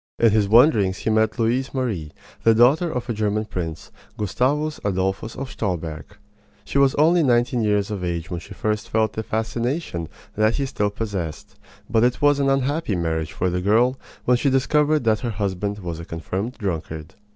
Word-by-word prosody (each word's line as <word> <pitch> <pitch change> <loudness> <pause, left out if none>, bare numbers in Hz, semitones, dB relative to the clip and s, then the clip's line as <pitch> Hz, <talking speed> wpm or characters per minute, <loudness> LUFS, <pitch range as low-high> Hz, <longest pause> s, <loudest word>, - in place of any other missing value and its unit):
In 115 -2 +4
his 105 -2 +2
wanderings 110 -6 +5
he 110 - -1
met 110 +1 +2
Louise 125 +4 0
Marie, 105 - -2 0.3
the 115 0 +5
daughter 140 +9 +4
of 125 -3 -4
a 120 - -1
German 110 0 -1
prince, 85 -6 -5 0.3
Gustavus 140 +9 0
Adolphus 95 +3 -1
of 135 0 -6
Stolberg. 85 -2 -4 0.5
She 140 - 0
was 140 -1 +4
only 165 +4 +4
nineteen 120 -3 +2
years 105 -1 +1
of 100 -3 -4
age 85 -1 -3
when 85 - -3
she 100 +3 -11
first 105 +1 -2
felt 110 -1 +1
the 110 - -3
fascination 115 - -2 0.3
that 110 +2 +2
he 140 - -1
still 105 -6 -1
possessed; 100 -7 -5 0.3
but 115 -1 +2
it 125 0 +2
was 145 -1 +4
an 140 -1 +2
unhappy 135 - 0
marriage 80 -2 -2
for 90 0 -1
the 90 +1 -1
girl 115 +7 +3 0.3
when 125 0 +4
she 140 - +1
discovered 150 +3 +2
that 110 -2 +2
her 120 - -3
husband 100 -1 -2
was 85 -5 -5
a 85 - -7
confirmed 95 +9 -4
drunkard. 80 -5 -4
110 Hz, 185 wpm, -22 LUFS, 95-125 Hz, 0.5 s, wanderings